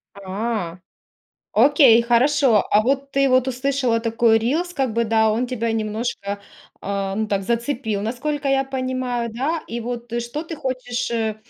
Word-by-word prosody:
А. 200 -2 -3 0.8
Окей, 250 -1 +6
хорошо. 240 -1 +3
А 210 - +5
вот 275 +3 0
ты 275 0 +2
вот 255 0 +3
услышала 255 -2 0
такой 225 0 +3
рилс, 310 +11 -1
как 265 -8 -1
бы 235 0 +2
да, 220 0 +3
он 235 +4 0
тебя 230 -2 -2
немножко, 215 -2 -3 0.4
а, 195 -1 -3
ну, 220 +1 -1
так 195 -1 0
зацепил, 235 -1 -2
насколько 275 +6 -2
я 270 0 +2
понимаю, 255 -3 -2
да. 300 +7 -2
И 235 +1 -5
вот 240 0 -5
что 240 +7 -5
ты 325 -1 -7
хочешь, 255 -3 -3
э, 220 -2 -1
235 Hz, 155 wpm, -21 LUFS, 220-270 Hz, 0.8 s, Окей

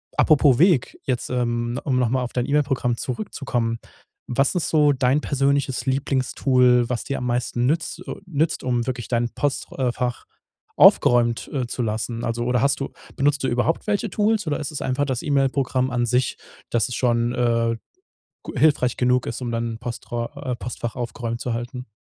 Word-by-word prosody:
apropos 145 -5 +5
Weg, 170 -5 +3
jetzt, 125 -3 -2
ähm 120 0 -1
um 130 -4 +1
noch 120 -3 +2
mal 130 0 +1
auf 120 - -6
dein 125 -1 -1
E-Mail-Programm 135 -5 +1
zurückzukommen, 125 - -3 0.5
was 135 +6 +1
ist 175 - 0
so 150 -2 +4
dein 130 +2 +2
persönliches 140 -2 0
Lieblingstool, 130 -2 +2
was 125 -2 -2
dir 140 - -3
am 125 - -4
meisten 120 0 0
nütz 165 +3 -1
äh, - - -4
nützt 160 -2 -1
um 125 -1 0
wirklich 125 -2 -3
dein 120 -1 +1
Postr 145 +3 -3
äh, 125 -2 +2
Fach 120 0 -3 0.5
aufgeräumt, 120 -1 +5
äh, 130 -4 -1
zu 125 - -4
lassen? 115 +1 -3
Also 120 0 -2
oder 125 0 +1
hast 140 0 +2
du 135 - -4 0.2
benutzt 140 0 +1
du 130 - +1
überhaupt 120 +7 0
welche 205 0 0
Tools 210 -2 +1
oder 145 - 0
ist 150 0 -4
es 150 - -5
einfach 130 +2 0
das 130 -3 -2
E-Mail-Programm 135 -2 +1
an 120 -1 +1
sich, 125 +2 +1 0.3
dass 120 +2 +1
es 125 - -4
schon, 120 -1 +1
äh, 115 -1 +1 0.7
g - - -6
hilfreich 135 -5 +3
genug 125 0 +2
ist, 115 - -4
um 120 -1 -3
dann 115 -1 -2
postra 120 +3 -5
äh, - - -2
Postfach 120 0 -5
aufgeräumt 120 -1 -4
zu 125 - -2
halten? 125 +2 -5
125 Hz, 185 wpm, -23 LUFS, 120-140 Hz, 0.7 s, apropos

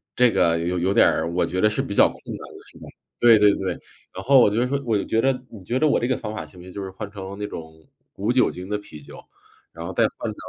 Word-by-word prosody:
这 125 -2 +4
个 85 -4 +2
有 90 +2 -1
有 95 +3 +1
点 - - +6
儿 80 +1 -2
我 90 - +1
觉 90 +3 -3
得 110 - +5
是 110 +5 -1
比 130 -7 -5
较 - - +6
困 - - -14
难 - - -6 0.2
的 - - -15
是 - - -17
吧？ - - -13 0.4
对 115 -2 +6
对 105 0 +6
对。 95 -1 -2 0.4
然 95 - -7
后 135 +1 +6
我 110 - +6
觉 105 - -3
得 125 - +1
说 140 +2 -2
我 115 - +1
就 - - -2
觉 110 - 0
得 135 +2 +3 0.2
你 105 -5 -11
觉 120 +7 -1
得 155 - +3
我 145 - +2
这 120 - -1
个 130 - +1
方 110 -1 -6
法 110 - -5
行 90 - -16
不 - - -11
行， 95 - -11
就 100 - -6
是 95 - -7
换 100 +2 -7
成 100 -1 -8
那 105 - -3
种 80 -1 -8 0.5
无 105 +4 0
酒 125 0 +3
精 90 +1 -9
的 105 - -1
啤 75 -7 -12
酒， - - -13 0.6
然 85 +1 -8
后 95 - -5
再 - - +2
换 - - -4
成 - - -10
100 Hz, 330 characters per minute, -23 LUFS, 90-120 Hz, 0.6 s, 点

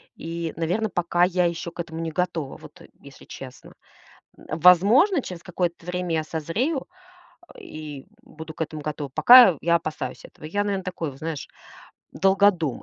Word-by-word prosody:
И, 165 0 -5
наверно, 180 +7 -1
пока 175 -1 0
я 180 0 +1
ещё 170 0 -3
к 170 - -19
этому 165 -1 -8
не 165 -1 -3
готова, 165 -5 -3
вот, - - -15
э, - - -14
если - - -15
честно. - - -11 0.6
М, 155 - -7
возможно, 210 - +5
через 180 -7 -8
какое-то 175 -1 -3
время 180 -1 -3
я 155 - 0
созрею 200 - -3 0.7
и 150 -3 -9 0.2
буду 160 -9 -11
к 160 - -9
этому 155 -1 -8
готова. 150 -1 -5
Пока 240 - +8
я 170 +1 +2
опасаюсь 160 -2 -4
этого. - - -14
Я, 205 +6 -1
наверно, 200 -2 -2
такой, 175 -4 -4
вот 135 - -15
знаешь, 160 -2 -5 0.7
долгодум. 190 -7 +2
170 Hz, 165 wpm, -24 LUFS, 160-185 Hz, 0.7 s, Пока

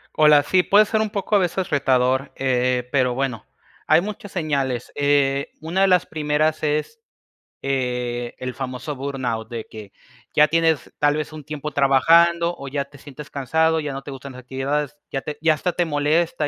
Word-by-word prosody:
Hola, 150 -1 +6
sí, 185 +4 +3
puede 210 +2 +5
ser 220 +1 0
un 215 -1 0
poco, 205 +1 -1
a - - +3
veces, 185 0 -1
retador, 130 -1 +1
eh, 125 -1 0
pero 130 -3 +2
bueno, 130 -4 -3 0.4
hay 170 - +5
muchas 205 0 -7
señales, 140 -8 -2
eh, 140 -1 +1
una 170 +5 -1
de 195 - +5
las 180 -2 +3
primeras 155 0 0
es, 155 - -1 0.6
eh, 125 -3 -2
el 125 -1 -4
famoso 135 +2 -5
burnout, 130 -5 -3
de 115 -2 -6
que, 105 -3 -10 0.4
ya 150 0 +5
tienes, 160 -4 +1
tal 145 +1 +3
vez, 155 0 -4
un 155 - -9
tiempo 150 +1 -6
trabajando, 170 +5 +4
o 140 -1 -7
ya 140 0 -2
te 145 +1 -17
sientes 145 +2 -11
cansado, 160 +4 +1
ya 150 - -4
no 135 0 -6
te 140 - -8
gustan 135 0 -8
las 125 - -10
actividades, 135 +3 -2 0.2
ya 135 - -1
te 150 - -6
ya 160 -1 +4
hasta 175 +4 -2
te 175 - +1
molesta 150 +1 0
145 Hz, 185 wpm, -22 LUFS, 130-160 Hz, 0.6 s, Hola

